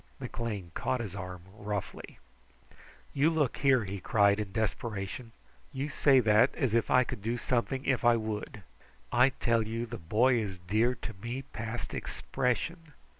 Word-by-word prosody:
McLean 105 -7 -4
caught 130 - -1
his 105 -6 -5
arm 90 -2 -7
roughly. 105 -2 -5 1.0
"You 145 +3 +4
look 155 -6 0
here!" 135 -4 +4
he 100 +1 -5
cried 100 +1 +3
in 105 -2 -3
desperation. 110 +1 -3 0.4
"You 140 +1 -3
say 140 -2 +5
that 110 +3 +4
as 130 -6 0
if 115 -1 +2
I 130 - +5
could 125 -4 -6
do 115 +4 -1
something 130 +3 -1
if 135 -3 +1
I 120 0 +6
would. 110 -1 -5 0.5
I 125 +2 +5
tell 115 -3 +1
you 115 +2 -3
the 115 - -7
boy 115 +9 +3
is 100 -4 -4
dear 110 +8 +1
to - - -7
me 120 +4 -4
past 115 -2 -6
expression. 150 +5 -2
115 Hz, 160 wpm, -30 LUFS, 105-130 Hz, 1.0 s, I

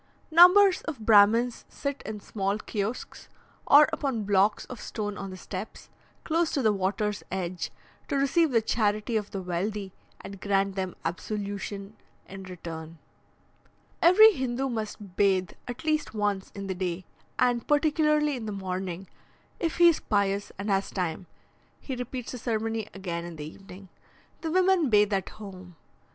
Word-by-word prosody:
Numbers 365 +4 +7
of 270 -10 -5
Brahmins 225 +3 +5
sit 280 -1 -4
in 215 -1 -5
small 195 0 -2
kiosks, 215 +2 -5 0.4
or 295 +1 +8
upon 270 -8 -1
blocks 200 +1 +2
of 250 - -9
stone 205 -2 -4
on 195 -1 -6
the 185 - -8
steps, 190 +3 -8 0.3
close 330 0 +1
to 275 - 0
the 215 -1 +4
water's 205 +2 -1
edge, 180 -1 -3 0.4
to - - -2
receive 280 +4 +3
the 230 -4 +2
charity 215 +1 0
of 210 -2 -1
the 195 -2 -5
wealthy, 190 +2 -3 0.3
and 195 -1 -10
grant 195 -1 +1
them 190 -2 -3
absolution 200 +3 -4 0.3
in 195 0 -9
return. 165 -3 -8 1.0
Every 420 +6 +8
Hindoo 260 - -2
must 215 -4 -5
bathe 190 -3 +2 0.2
at 245 +1 -6
least 310 -6 -1
once 205 -2 -1
in 200 -1 -5
the 190 - -2
day, 180 -1 -3 0.3
and 245 -1 +1
particularly 300 0 +2
in 230 -3 -6
the - - -3
morning; 190 -1 -4 0.5
if 330 -2 -1
he 345 0 +7
is 335 - +4
pious 200 -1 0
and 200 +2 -2
has 195 0 +1
time, 180 -1 -3 0.5
he 265 - -5
repeats 250 0 -5
the 250 - -6
ceremony 225 -2 -2
again 175 -3 -4
in 170 -1 -8
the 150 -1 -7
evening. 190 +4 -12 0.5
The 325 - -3
women 365 -3 +3
bathe 210 -1 +4
at 195 -2 -1
home. 185 -4 -11
210 Hz, 155 wpm, -27 LUFS, 195-255 Hz, 1.0 s, or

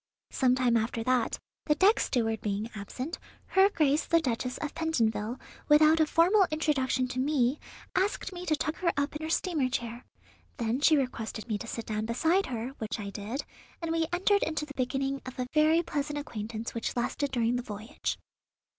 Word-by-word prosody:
Some 255 -1 +3
time 250 -2 +2
after 225 +1 -1
that, 250 -1 +1 0.3
the 300 - +4
deck 395 +6 +5
steward 225 -3 0
being 210 +2 -2
absent, 250 - -5 0.3
her 385 +1 +5
Grace 305 -5 +2
the 335 - +3
Duchess 250 -3 -2
of 300 - -4
Pentonville, 240 -7 0 0.3
without 310 +2 +6
a 315 - +4
formal 365 +5 +4
introduction 275 -5 +1
to 255 - -3
me, 270 -1 +2 0.3
asked 385 0 0
me 355 0 -6
to 310 - +3
tuck 305 +1 -2
her 345 -2 +1
up 285 +1 0
in 300 - -4
her 315 - -3
steamer 320 -6 +1
chair; 240 -1 -3 0.5
then 235 +1 -1
she 310 +1 +6
requested 230 -4 -3
me 215 -3 -1
to 230 - -7
sit 230 0 -5
down 215 0 -2
beside 325 +11 +2
her, 235 -1 -3
which 220 +1 -3
I 200 -1 -5
did, 220 +8 -4 0.3
and 330 -1 -3
we 330 -1 +1
entered 390 +3 +3
into 310 -1 -1
the 290 - -10
beginning 270 +1 -1
of 255 - -9
a 250 - -1
very 315 +2 +4
pleasant 295 -1 -2
acquaintance 230 -5 -5
which 230 - -3
lasted 265 +4 -1
during 240 -1 +1
the 245 - 0
voyage." 220 +3 -4
265 Hz, 190 wpm, -29 LUFS, 230-315 Hz, 0.5 s, without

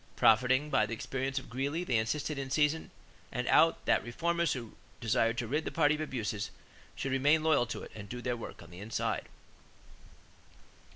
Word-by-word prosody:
Profiting 130 +6 +4
by - - +3
the 115 - -3
experience 135 +3 -3
of 135 - -3
Greeley 140 +8 -2
they 125 -10 +1
insisted 145 +6 -2
in 135 -1 -4
season 150 +3 +1 0.4
and - - -2
out - - +4
that - - +3
reformers 170 +8 0
who 120 -4 -7 0.2
desired 115 0 +1
to 120 - -1
rid 150 +7 0
the - - -3
party 150 -2 +3
of 155 - -3
abuses 110 -8 -3 0.5
should 135 - -3
remain 145 +4 +3
loyal 155 -6 +3
to 110 - -5
it - - -10
and 100 -2 -9
do 125 - -5
their 120 0 -1
work 115 - -8
"on - - -15
the 90 - -10
inside." 110 +3 -2
130 Hz, 185 wpm, -31 LUFS, 115-150 Hz, 0.5 s, Profiting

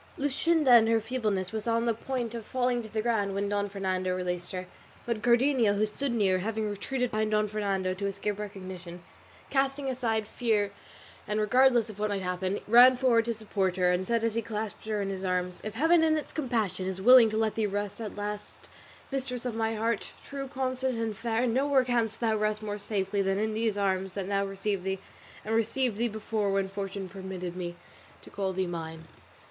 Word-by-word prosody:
Luscinda 285 -1 +3
in 225 - +2
her 225 0 +4
feebleness 215 -5 -2
was 220 0 -4
on 230 0 +2
the 230 - +2
point 240 0 -3
of 230 -1 -5
falling 245 +1 0
to 220 - -9
the 215 -1 -1
ground 205 -4 0
when 200 +1 0
Don 205 0 -1
Fernando 185 -2 -1
released 180 -1 -3
her, 185 -1 -4 0.4
but 235 -3 -2
Cardenio, 240 -2 +4
who 210 +1 +2
stood 260 +5 -2
near, 195 -5 +2
having 215 +2 -2
retreated 250 +5 -2
behind 215 0 0
Don 215 0 +2
Fernando 195 -3 -1
to 200 +2 -3
escape 200 +1 -3
recognition, 185 -4 -7 0.5
casting 275 +1 +1
fear 265 - 0
aside 225 -4 -1 1.0
and 210 0 0
regardless 245 +2 +4
of 210 - -14
what 210 0 0
might 200 -2 -2
happen, 185 +2 -2
ran 245 +3 +8
forward 240 -3 +3
to 235 - 0
support 200 -4 -1
her, 180 -1 +3
and 180 +1 0
said 230 -1 +1
as 230 -1 +1
he 230 - 0
clasped 215 0 -5
her 210 -2 0
in 195 - -2
his 190 0 -5
arms, 180 -1 -1
"If 215 0 -5
Heaven 320 +6 +4
in 315 -1 +3
its 305 - -5
compassion 225 - -1
is 190 0 -3
willing 240 +2 +8
to 215 - -2
let 220 -1 +1
thee 220 -2 0
rest 205 +2 -3
at 215 - -5
last, 205 0 -6 0.4
mistress 255 -2 -3
of 245 - -2
my 225 0 -1
heart, 225 0 -1
true, 275 -1 -5
constant, 260 -2 -1
and 225 -2 -2
fair, 230 +2 0
nowhere 265 +3 +3
canst 235 -3 0
thou 225 -2 +2
rest 215 0 -1
more 205 -1 -4
safely 200 -1 -1
than 195 0 +1
in 215 +1 0
these 220 -1 0
arms 190 -1 0
that 195 -1 -4
now 200 0 +1
receive 195 -1 -2
thee, 190 0 -1 0.5
and 220 - -2
received 230 0 +1
thee 235 +2 +1
before 215 -2 -2
when 195 -1 0
fortune 195 0 -4
permitted 185 -2 -6
me 175 -1 -4 0.5
to - - -14
call 195 -1 -2
thee 190 0 -1
mine." 160 -2 -5
215 Hz, 205 wpm, -29 LUFS, 195-235 Hz, 1.0 s, ran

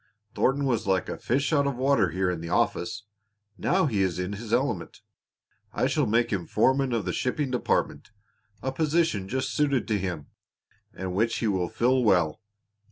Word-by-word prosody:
Thornton 140 +1 +1
was 120 -6 0
like 95 -2 +1
a - - -5
fish 140 +5 0
out 140 -2 +3
of 140 - -1
water 130 -7 +2
here 90 +3 0
in 85 -2 -4
the 85 - -6
office. 110 +5 0 0.5
Now 185 +8 +1
he 110 -9 0
is 95 -3 0
in 90 +2 -3
his 110 +2 -7
element. - - -1 0.7
I - - +1
shall - - +1
make 115 +1 +1
him 90 -4 -2
foreman 135 0 +2
of 115 -5 -1
the 90 - -2
shipping 130 +1 -1
department 125 - -1 0.5
a 130 - -1
position 155 - 0
just 130 +5 -2
suited 140 -4 +1
to 105 -2 +1
him, 90 -6 -4 0.7
and 95 0 -5
which 115 +4 +1
he 115 - -1
will 95 -4 0
fill 125 +2 +2
well." 90 -6 +2
115 Hz, 180 wpm, -26 LUFS, 95-135 Hz, 0.7 s, out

